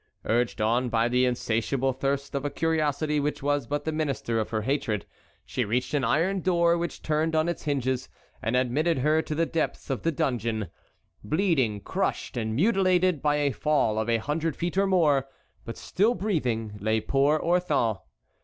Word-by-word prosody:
Urged 120 +1 0
on 120 +4 +1
by 115 0 +2
the 125 +1 +2
insatiable 125 +2 0
thirst 140 +2 -2
of 140 -1 -2
a 145 - -1
curiosity 150 -1 0
which 145 0 -2
was 145 -3 0
but 145 +2 -2
the 160 - 0
minister 140 -7 -1
of 110 - -2
her 110 -1 -2
hatred, 110 - -1 0.4
she - - -2
reached 125 +7 -1
an 145 -3 +1
iron 180 +10 +1
door 170 -2 +3
which 170 0 -4
turned 155 +1 0
on 155 +1 +2
its 170 -3 -3
hinges 130 -3 -1 0.3
and 115 +3 -1
admitted 135 +6 +1
her 155 +4 +2
to 155 - -4
the 165 +2 +2
depths 160 -3 -2
of 130 - -2
the 165 - +1
dungeon. 115 - -1 0.5
Bleeding, 130 - +1
crushed, - - -2
and 110 -2 -2
mutilated 185 - +2
by 150 -1 +2
a 145 -1 +1
fall 125 -4 +1
of 110 +1 -2
a 115 - +3
hundred 150 +6 -2
feet 175 +1 -3
or 195 +1 +3
more, 150 -8 +3 0.4
but 115 - -6
still 220 +6 +1
breathing, 120 - -2
lay 110 +2 +1
poor 140 +7 +2
Orthon. 170 - +1
140 Hz, 180 wpm, -27 LUFS, 120-160 Hz, 0.5 s, door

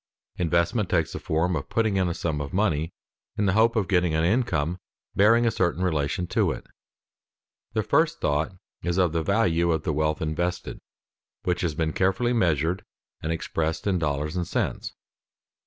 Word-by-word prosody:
Investment 85 +5 +1
takes 85 -4 +1
the - - -4
form 85 +3 0
of 70 - -4
putting 110 -3 +1
in 95 -1 +2
a 85 - -2
sum 75 -3 -2
of 70 - -6
money 85 -5 +1 0.5
in 105 - +1
the 95 - +2
hope 115 +2 +4
of 105 -5 +1
getting 90 -4 +2
an 80 - +2
income 90 - +1 0.4
bearing 115 +4 +5
a 115 - +3
certain 90 -2 0
relation 80 +1 0
to - - +1
it. - - -6 1.1
The - - +1
first - - +2
thought 75 +2 0 0.3
is 85 0 -1
of 90 -3 +3
the 80 0 0
value 85 -3 +2
of 80 -2 0
the 80 - -1
wealth 75 0 0
invested, 85 +3 -2 0.6
which 90 -1 0
has 85 -5 -1
been 80 0 -1
carefully 95 +6 +1
measured 85 - +1 0.4
and 80 - -2
expressed 80 -1 -2
in 95 -3 +1
dollars 75 0 -1
and 90 -2 -1
cents. - - -2
85 Hz, 175 wpm, -26 LUFS, 80-95 Hz, 1.1 s, bearing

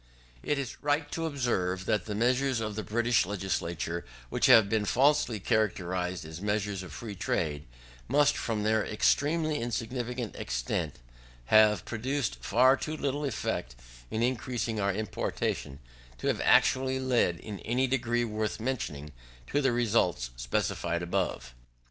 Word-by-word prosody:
It 145 - 0
is 135 -3 -5
right 145 0 0
to 165 0 -2
observe 95 - -1
that 105 - 0
the 105 - -4
measures 125 +3 +2
of 110 -2 -3
the 110 - -2
British 115 +4 +2
Legislature 85 -4 -2 0.3
which - - +2
have 110 -3 +8
been 110 +1 +1
falsely 125 0 +2
characterised 95 -5 -1
as 80 +2 -8
measures 105 -1 -1
of 90 -3 -9
free 105 +8 -6
trade, 75 -6 -2 0.4
must, 145 0 +4
from 110 -3 -2
their 110 0 +2
extremely 150 +7 +1
insignificant 120 0 -3
extent, - - -2 0.6
have 105 -3 +6
produced 130 +3 -2
far 130 +3 +5
too 155 +3 -4
little 145 +1 -1
effect 80 - -3 0.3
in 110 - -1
increasing 120 -2 -1
our 100 0 +2
importation, 90 -8 -3 0.4
to - - -8
have - - +1
actually 130 0 +4
led, 125 -9 +2
in 105 -1 -7
any 125 +4 0
degree 120 -2 0
worth 110 0 -2
mentioning, 75 - -3 0.4
to 145 - +2
the 135 -2 +3
results 105 - +1
specified 85 +7 -1
above. 85 -9 -2
110 Hz, 140 wpm, -29 LUFS, 95-130 Hz, 0.6 s, have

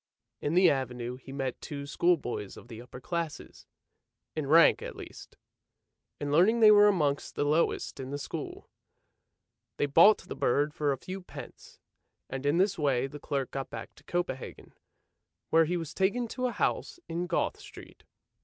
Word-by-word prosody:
In 145 +3 -1
the 185 0 +6
Avenue 125 -2 -1
he 135 +1 -12
met 135 -2 -4
two 140 -1 -6
schoolboys 140 - 0
of 120 - -13
the 115 -1 -9
upper 125 +1 -11
classes 165 +1 -5 0.3
— - - -57
in 155 -3 -2
rank 165 +4 +6
at - - -7
least; - - -11 0.8
in 145 0 -3
learning 190 +10 +4
they 215 -2 +8
were 205 0 +7
amongst 150 -8 0
the - - 0
lowest 150 +3 0
in 130 -1 -6
the 145 - -3
school. 145 - -7 1.1
They - - +1
bought 165 +9 +6
the - - -9
bird 145 +4 +1
for 150 -2 0
a 135 - -1
few 185 +8 -7
pence, 180 - -11 0.5
and 135 +1 -3
in 145 +4 +2
this 190 0 +2
way 135 -4 +1
the 145 +2 -8
clerk 140 -2 -3
got 135 -1 -4
back 115 0 -8
to - - -20
Copenhagen, 175 -7 -4 0.8
where 165 0 +5
he 175 +3 -1
was 165 -3 -6
taken 215 +6 0
to 255 +2 -2
a - - -2
house 350 - -1
in 175 +2 -3
Goth 170 - -1
Street. - - -13
145 Hz, 175 wpm, -29 LUFS, 135-175 Hz, 1.1 s, they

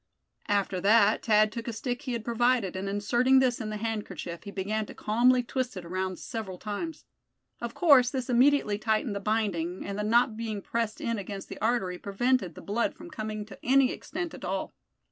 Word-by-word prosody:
After 195 -2 0
that 210 +1 +4
Thad 215 -1 +4
took 230 +1 -6
a - - -1
stick 245 +3 -3
he 260 -4 -4
had 230 -2 -4
provided, 240 -4 +1
and 190 +1 -3
inserting 240 +6 +3
this 255 -2 +3
in 215 - -4
the 215 - -3
handkerchief, 205 -6 -4
he - - -6
began 205 +2 -2
to - - -10
calmly 245 +4 +3
twist 250 -3 -3
it 180 - -7
around 185 +1 -3
several 210 -5 -6
times. 215 - -5 0.6
Of 235 0 -5
course 280 -8 +6
this 260 -2 -3
immediately 250 -4 +3
tightened 220 0 0
the - - -2
binding, 195 -5 -1
and 200 +1 -4
the - - -1
knot 230 +1 +3
being 220 -2 -3
pressed 230 -2 -2
in 230 -2 -1
against 195 0 -7
the - - -8
artery, 205 -6 0
prevented 200 -2 0
the - - -9
blood 220 +4 -1
from 340 +1 -11
coming 215 -1 -4
to 205 - -12
any 265 0 +4
extent 350 -2 -5
at - - -10
all. - - -3
220 Hz, 200 wpm, -28 LUFS, 200-245 Hz, 0.6 s, course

